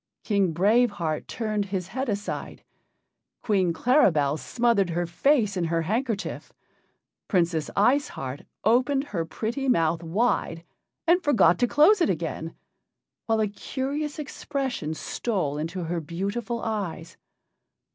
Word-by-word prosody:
King 200 -5 +1
Brave 215 +9 +4
Heart 160 -4 -3
turned 215 -3 -2
his 190 -2 -4
head 260 +4 -3
aside. 205 0 -4 0.8
Queen 190 -6 +2
Claribel 165 - +3
smothered 230 -6 +1
her 175 +1 -1
face 210 - +2
in 180 -2 0
her 165 0 0
handkerchief. 220 +3 -2 0.8
Princess 170 -5 +1
Ice 270 +8 +3
Heart 135 +1 -6 0.2
opened 255 +5 +3
her 190 - -3
pretty 235 - -3
mouth 165 -7 +2
wide 170 -2 0 0.4
and 345 +2 +4
forgot 205 - +4
to 245 - +3
close 360 - +5
it - - +3
again, 165 -2 -3 0.7
while 225 -1 +2
a 215 - +2
curious 280 +8 -4
expression 270 - -3
stole 155 -8 -2
into 170 +4 -3
her 170 +1 -2
beautiful 200 +9 -3
eyes. 195 -7 -4
200 Hz, 125 wpm, -26 LUFS, 170-245 Hz, 0.8 s, close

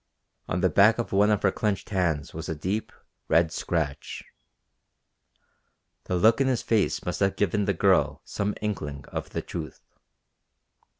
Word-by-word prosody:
On 85 - -1
the 95 - +3
back 105 +6 +5
of 120 - -3
one 100 +2 +4
of 105 -2 +1
her 95 - +4
clenched 105 +2 -2
hands 85 -7 0
was 80 0 -6
a 80 - -2
deep, 95 +8 -3 0.4
red 85 0 +3
scratch. 75 -5 -3 1.8
The 90 - -1
look 110 +8 +4
in 135 - +3
his 130 -3 0
face 110 -3 +1
must 90 - -3
have 100 -1 +2
given 105 +1 +1
the 100 - +1
girl - - +2
some 100 +1 -2
inkling 75 -10 -4
of - - -5
the - - -4
truth. - - -7
95 Hz, 160 wpm, -26 LUFS, 85-105 Hz, 1.8 s, back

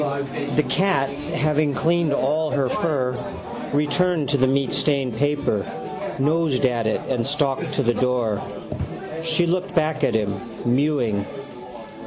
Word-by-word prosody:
The 150 - +4
cat, 180 -8 +2
having 150 0 0
cleaned 170 0 +2
all 150 +3 +1
her 140 -3 +1
fur, 130 -7 0 0.6
returned 150 +2 +1
to 145 - +3
the 130 0 +4
meatstained 135 -1 +1
paper, 145 -6 +1 0.5
nosed 145 -1 +2
at 120 -3 +1
it 110 - 0
and 125 -3 0
stalked 145 +3 0
to 140 - +1
the 120 0 +3
door. 120 -5 +1 0.8
She 165 +1 +2
looked 180 +2 -1
back 155 -2 +1
at 120 -4 +2
him, 100 -3 0 0.3
mewing. 120 -5 +1
145 Hz, 130 wpm, -23 LUFS, 125-155 Hz, 0.8 s, The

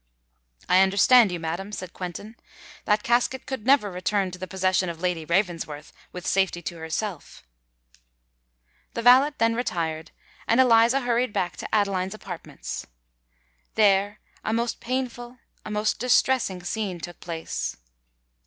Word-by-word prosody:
"I 180 - +5
understand 200 +3 +5
you, 175 - -3
madam," 170 +5 -4
said 185 -3 -7
Quentin. 190 +5 -7 0.5
"That 210 0 +2
casket 245 +2 +1
could 260 -4 -6
never 260 -7 +4
return 185 +1 -1
to 180 - -9
the 185 - -5
possession 185 0 +1
of 165 -1 -6
Lady 175 -3 -1
Ravensworth, 170 -4 -2 0.2
with 180 0 -8
safety 190 -2 +1
to 170 - -5
herself." 160 +2 -5 1.5
The 230 - -3
valet 260 +5 +6
then 230 0 +2
retired; 165 -9 -2 0.4
and 230 - +3
Eliza 240 +1 +5
hurried 245 -2 0
back 175 -1 -1
to - - -5
Adeline's 195 -2 0
apartments. 180 -5 -7 0.9
There 205 -1 +3 0.3
a - - -1
most 230 +1 -1
painful—a 245 -2 -6
most 210 0 0
distressing 245 -6 +2
scene 190 -1 -3
took 175 +1 -8
place. 165 -2 -4
200 Hz, 135 wpm, -25 LUFS, 180-235 Hz, 1.5 s, valet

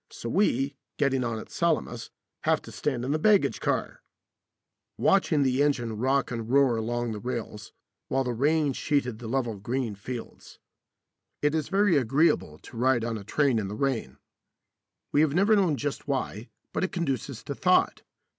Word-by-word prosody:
So 115 - -7
we, 140 - +1 0.2
getting 135 -3 +1
on 115 -2 -2
at 110 - -9
Salamis, 155 -8 -1 0.4
have - - +3
to - - -10
stand 125 -4 -2
in 135 - -1
the 155 - +1
baggage 205 +3 +3
car) - - -2 1.0
watching 165 -7 +3
the 130 0 +2
engine 120 -6 +1
rock 130 +5 +1
and 115 -2 -4
roar 135 -2 +4
along 120 +1 -2
the 105 - -5
rails, 115 -3 -5 0.4
while 135 0 +1
the 125 -1 -2
rain 145 +3 +2
sheeted 125 -5 -1
the 120 - -7
level 120 -3 -1
green 120 +2 -2
fields. 115 +4 -8 0.9
It 150 0 +3
is 155 -2 -1
very 195 -4 +3
agreeable 125 - +2
to 115 - -13
ride 120 -1 +2
on 115 -1 -2
a 105 - -6
train 135 +2 +1
in 100 - -3
the 100 - -5
rain. 115 - -2 0.9
We 145 - +4
have 155 -1 +2
never 200 +4 +4
known 180 -8 +2
just 145 +1 -4
why, 130 -5 -3 0.2
but - - -1
it 190 - -1
conduces 140 - -3
to - - -4
thought. - - +2
130 Hz, 175 wpm, -27 LUFS, 115-145 Hz, 1.0 s, roar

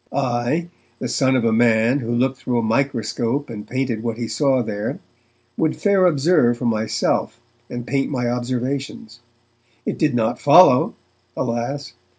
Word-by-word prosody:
I, 130 +5 -1 0.3
the - - -4
son 130 -2 +1
of 125 -3 +1
a 115 - +3
man 115 +3 +3
who 120 -3 -4
looked 130 +2 0
through 125 -1 -2
a 115 - 0
microscope 120 +2 -1
and 105 -2 -8
painted 130 -4 -2
what 115 -1 -3
he 120 -1 -3
saw 135 -2 +1
there, 105 0 -4 0.6
would 160 -1 +1
fair 195 -3 +3
observe 140 -6 +3
for 120 - -5
myself, 110 +1 -1 0.3
and 120 -1 -6
paint 135 +1 -1
my 125 -4 -2
observations. 125 -1 -4 0.7
It - - -3
did 150 -6 +1
not 110 -2 0
follow, - - +6 0.4
alas! 125 +3 -3
120 Hz, 155 wpm, -21 LUFS, 115-135 Hz, 0.7 s, follow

